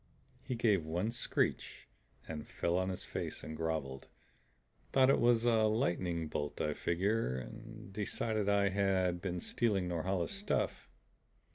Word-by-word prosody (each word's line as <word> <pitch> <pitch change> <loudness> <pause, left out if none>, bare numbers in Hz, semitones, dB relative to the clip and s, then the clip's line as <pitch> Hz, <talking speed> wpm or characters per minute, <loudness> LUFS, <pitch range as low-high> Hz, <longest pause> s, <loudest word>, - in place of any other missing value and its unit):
"He 125 - -3
gave 105 -7 +3
one 90 +8 -1
screech 120 - -1 0.4
and 75 -2 -6
fell 85 - -1
on 95 +1 +1
his 95 - -4
face - - -4
and 80 - -6
groveled. 80 -5 -3 0.9
Thought 135 0 +6
it - - +3
was 120 -1 +4
a 115 -2 +4
lightning 90 -7 0
bolt, 75 -1 -3
I 75 - 0
figure; 85 - 0 0.5
decided 105 +1 -1
I 100 -1 +4
had 95 -3 +1
been 90 -2 -2
stealing 100 -1 0
Norhala's 90 +1 -1
stuff. 200 +1 -1
95 Hz, 135 wpm, -34 LUFS, 85-110 Hz, 0.9 s, Thought